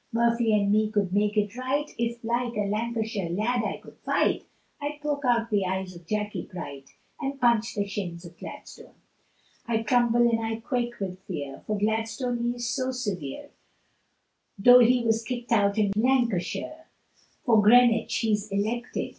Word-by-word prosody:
Murphy 235 0 +2
and 200 -1 +2
me 215 0 +3
could 200 -4 0
make 210 +1 +1
it 210 +1 0
right, 265 +4 -2
If 235 0 -3
like 235 +1 -1
a 205 -1 0
Lancashire 220 -3 -2
lad 220 +7 0
I 205 - -2
could - - -16
fight, - - +1 0.4
I'd 295 +1 -4
poke 290 -1 -2
out 235 -2 +2
the 205 -2 +2
eyes 190 0 -3
of 170 -1 -14
Jackey 210 -1 -3
Bright, 140 -7 -8 0.2
And 275 -1 -4
punch 235 -3 +2
the 205 -1 -1
shins 180 -3 -5
of 170 0 -12
Gladstone. - - -11 0.7
I 225 -1 0
tremble 240 +1 +3
and 225 -1 +1
I 225 0 -1
quake 240 +1 -3
with 185 -2 -4
fear, 145 -7 -5
For 215 - 0
Gladstone 225 +4 -1
he 240 +1 -1
is 240 0 -4
so 255 +1 -1
severe, 200 - -4 1.1
Though 245 +5 +8
he 245 0 +4
was 225 -1 +2
kicked 240 +1 -5
out 200 -2 +3
in 205 -2 +2
Lancashire, 245 - 0 0.6
For 225 -4 +5
Greenwich 230 +1 +5
he's 215 -1 0
elected. 220 +5 -2
225 Hz, 165 wpm, -26 LUFS, 205-240 Hz, 1.1 s, Though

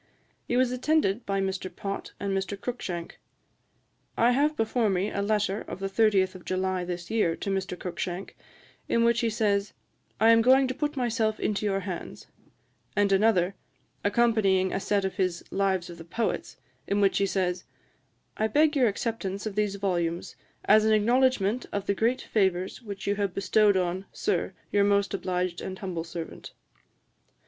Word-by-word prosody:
He 245 - +1
was 255 -1 +3
attended 250 -5 +1
by 195 -1 0
Mr. 190 -1 -2
Pott 195 +1 -6
and 200 -1 -1
Mr. 195 +1 -3
Cruikshank. 185 -8 -5 1.0
I 235 +2 +4
have 295 +4 +2
before 225 0 +1
me 190 +2 0
a 200 - -2
letter 205 -1 0
of - - -7
the 195 - -2
30th 195 -2 +3
of 185 -2 -11
July 185 0 -1
this 175 -1 -5
year, 210 -7 +2
to 200 - -4
Mr. 190 -2 -2
Cruikshank, 180 +1 -5 0.5
in 230 - +3
which 235 0 +3
he 230 - +1
says, 205 -2 0 0.5
'I 225 +2 +6
am 230 0 +6
going 260 +3 +5
to 255 - -2
put 295 +2 -3
myself 225 -3 0
into 210 0 -1
your 195 -1 0
hands;' 185 -2 -6 0.7
and 205 -1 +2
another, 195 -2 +3 0.5
accompanying 205 -4 +2
a - - 0
set 200 0 0
of 190 - -4
his 185 -3 0
Lives 190 -2 0
of 170 -1 -10
the - - -8
Poets, 225 +8 -3 0.3
in 200 - +1
which 200 -1 +3
he 200 - +2
says, 185 -2 -1 0.7
'I 220 - +2
beg 300 +7 +3
your 260 -4 +4
acceptance 205 -2 -3
of 215 - -3
these 205 -1 0
volumes, 175 -4 -2 0.3
as 215 +1 +6
an 220 0 +3
acknowledgement 240 0 +2
of 200 -1 -3
the 200 - +1
great 230 +5 +1
favours 190 -2 0
which 200 -4 -7
you 200 0 0
have 200 -3 -1
bestowed 205 +1 +3
on, 185 +1 -1
Sir, - - -1 0.2
your 205 -1 +3
most 200 -1 +2
obliged 180 -2 -2
and 190 - -5
most - - -15
humble 180 -4 -3
servant.' 165 -1 -8
200 Hz, 175 wpm, -27 LUFS, 190-225 Hz, 1.0 s, I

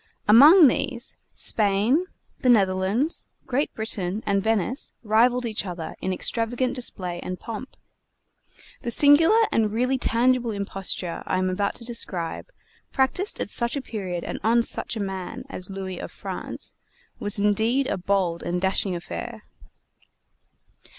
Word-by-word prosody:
Among 290 - +9
these, 260 -1 -2 0.2
Spain, 215 - +1 0.3
the 255 - +1
Netherlands, 200 - +1 0.2
Great 270 +4 -1
Britain, 210 -2 -3
and 200 -1 +1
Venice 225 - -1
rivaled 240 +3 +3
each 220 -2 -2
other 175 -4 -6
in 190 - -1
extravagant 235 +6 -1
display 180 -8 -3
and 180 +1 -6
pomp. 230 +3 -8 1.0
The 240 - -3
singular 295 - +5
and 215 -2 +1
really 250 +4 0
tangible 245 +1 +2
imposture 195 -4 -3
I - - 0
am 185 0 0
about 200 +2 -1
to 235 - -9
describe, 190 -8 -3 0.4
practiced 280 +10 0
at - - -3
such 235 +2 +4
a 280 - -2
period 185 -8 -5
and - - -5
on 235 +2 +3
such - - -2
a - - -4
man 190 -2 -5
as 180 +1 -5
Louis 190 -2 -6
of - - -7
France, - - -6 0.5
was 205 0 +3
indeed 220 +6 +2
a - - -1
bold 185 -2 0
and 175 +1 -2
dashing 190 0 0
affair. 220 +6 -7
220 Hz, 140 wpm, -24 LUFS, 190-250 Hz, 1.0 s, Among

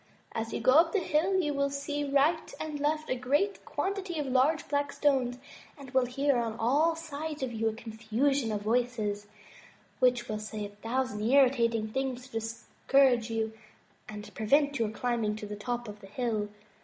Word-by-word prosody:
As 225 0 -3
you - - -2
go - - +4
up 325 +4 +5
the - - +3
hill, 360 +3 +1
you 300 -5 0
will 280 0 +1
see 285 +1 -3
right 290 +4 +1
and 305 -2 -4
left 305 +2 0
a - - +1
great 290 +11 0
quantity 385 -3 -3
of 295 - -1
large 270 +5 +2
black 285 -1 0
stones, 260 -5 +1 0.4
and 275 -3 -11
will 260 -1 +3
hear 275 +2 +1
on 230 -2 -1
all 290 +9 +3
sides 310 -2 -5
of 250 -2 -3
you 225 0 +1
a - - -4
confusion 225 +3 -1
of 205 -1 -2
voices, 215 -3 0 0.7
which 245 -1 +3
will 215 -1 -3
say 215 0 -5
a - - -7
thousand 225 +2 -2
irritating 235 -2 +3
things 255 +1 -2
to 260 - -16
discourage 235 +2 +1
you 220 -1 -1 0.6
and 210 0 -8
prevent 285 +5 +2
your 225 -2 +1
climbing 225 -1 -1
to 215 - -7
the 210 0 -5
top 240 +3 -3
of 210 0 -8
the 195 - -11
hill. 215 -1 -2
255 Hz, 180 wpm, -30 LUFS, 225-285 Hz, 0.7 s, up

